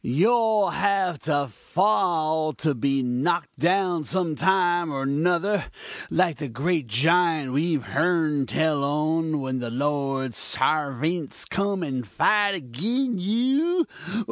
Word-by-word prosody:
you'll 170 Hz, -, +2 dB
all 220 Hz, -4 st, +2 dB
have 195 Hz, -5 st, 0 dB
to 145 Hz, -2 st, 0 dB
fall 160 Hz, -, 0 dB
and 145 Hz, -7 st, 0 dB
be 135 Hz, -1 st, +1 dB
knock'd 130 Hz, +8 st, -1 dB
down 180 Hz, -2 st, +1 dB
some 170 Hz, 0 st, -1 dB
time 175 Hz, -2 st, +2 dB
or 135 Hz, -1 st, -3 dB
nuther, 175 Hz, +8 st, +1 dB, 0.5 s
like 175 Hz, -4 st, +1 dB
the 145 Hz, -, -5 dB
great 145 Hz, +4 st, -1 dB
giant 155 Hz, +3 st, +2 dB
we've 150 Hz, -1 st, 0 dB
heern 155 Hz, -2 st, 0 dB
tell 155 Hz, -3 st, 0 dB
on, 155 Hz, +2 st, 0 dB
when 130 Hz, -1 st, -3 dB
the 120 Hz, -1 st, -4 dB
Lord's 135 Hz, -1 st, -2 dB
sarvints 150 Hz, +3 st, -1 dB
come 195 Hz, -1 st, -1 dB
and 130 Hz, -6 st, -4 dB
fight 205 Hz, -, +2 dB
agin 205 Hz, -, -2 dB
you! 270 Hz, -, +1 dB
160 Hz, 125 wpm, -24 LUFS, 140-185 Hz, 0.5 s, you'll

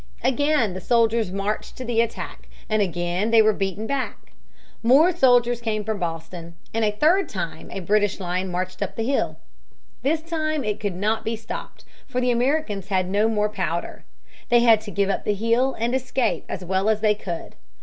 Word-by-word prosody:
Again 265 Hz, -4 st, +2 dB
the 185 Hz, -, -6 dB
soldiers 230 Hz, -2 st, +2 dB
marched 200 Hz, +2 st, -3 dB
to 255 Hz, -, -6 dB
the 230 Hz, -1 st, +2 dB
attack, 230 Hz, -1 st, -5 dB, 0.2 s
and 215 Hz, -1 st, +1 dB
again 175 Hz, +2 st, -1 dB
they 230 Hz, 0 st, +5 dB
were 215 Hz, 0 st, +4 dB
beaten 195 Hz, +2 st, -2 dB
back. 275 Hz, +1 st, -4 dB, 0.5 s
More 295 Hz, +9 st, +5 dB
soldiers 245 Hz, -5 st, +4 dB
came 215 Hz, -2 st, -1 dB
from 215 Hz, -1 st, -3 dB
Boston, 165 Hz, 0 st, -5 dB, 0.2 s
and 225 Hz, 0 st, 0 dB
a 215 Hz, -, +3 dB
third 315 Hz, -, +2 dB
time 175 Hz, -5 st, -5 dB
a 195 Hz, -, -5 dB
British 205 Hz, +2 st, +1 dB
line 185 Hz, 0 st, -2 dB
marched 185 Hz, +1 st, -4 dB
up -, -, -3 dB
the 225 Hz, -, -2 dB
hill. 270 Hz, +4 st, 0 dB, 0.6 s
This 315 Hz, +3 st, 0 dB
time 310 Hz, -3 st, -1 dB
it 210 Hz, -1 st, -2 dB
could 200 Hz, -4 st, -2 dB
not 215 Hz, +4 st, 0 dB
be 225 Hz, +1 st, -1 dB
stopped, 220 Hz, 0 st, -8 dB, 0.2 s
for 250 Hz, -, -2 dB
the 250 Hz, 0 st, +2 dB
Americans 240 Hz, -5 st, 0 dB
had 185 Hz, -2 st, +1 dB
no 210 Hz, +3 st, +3 dB
more 210 Hz, -1 st, +1 dB
powder. 180 Hz, -4 st, -3 dB, 0.5 s
They 240 Hz, 0 st, +5 dB
had 225 Hz, -3 st, +6 dB
to 220 Hz, -, -8 dB
give 200 Hz, -1 st, +1 dB
up -, -, -2 dB
the 210 Hz, -, 0 dB
hill 230 Hz, +5 st, +1 dB
and 235 Hz, +2 st, -1 dB
escape 260 Hz, -1 st, 0 dB
as 185 Hz, -, -5 dB
well 190 Hz, +3 st, +1 dB
as 215 Hz, -1 st, +1 dB
they 215 Hz, -1 st, +4 dB
could. 175 Hz, -5 st, -6 dB
215 Hz, 190 wpm, -23 LUFS, 195-245 Hz, 0.6 s, had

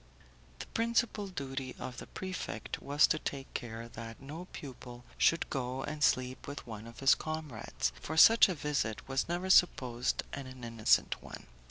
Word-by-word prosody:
The -, -, -6 dB
principal 230 Hz, -2 st, 0 dB
duty 135 Hz, -7 st, -5 dB
of 125 Hz, -2 st, -6 dB
the -, -, -8 dB
prefect 185 Hz, -1 st, -5 dB
was 145 Hz, +2 st, +4 dB
to 155 Hz, -, +1 dB
take 135 Hz, -3 st, -5 dB
care 115 Hz, -1 st, -5 dB
that 115 Hz, -1 st, -8 dB
no 150 Hz, +6 st, -8 dB
pupil 125 Hz, -3 st, -9 dB
should 165 Hz, -, +3 dB
go 130 Hz, -1 st, -2 dB
and 150 Hz, 0 st, -3 dB
sleep 130 Hz, 0 st, +1 dB
with 140 Hz, +1 st, -6 dB
one 110 Hz, -1 st, -8 dB
of 115 Hz, +2 st, -11 dB
his 135 Hz, -, +7 dB
comrades, 155 Hz, -7 st, -3 dB
for 160 Hz, -, -4 dB
such 225 Hz, +5 st, +9 dB
a 185 Hz, -, -1 dB
visit 145 Hz, -7 st, -2 dB
was 135 Hz, +4 st, -1 dB
never 180 Hz, +2 st, 0 dB
supposed 125 Hz, -9 st, +3 dB
an 135 Hz, -2 st, -5 dB, 0.2 s
innocent 115 Hz, -2 st, +2 dB
one. -, -, -10 dB
135 Hz, 165 wpm, -32 LUFS, 120-160 Hz, 0.2 s, such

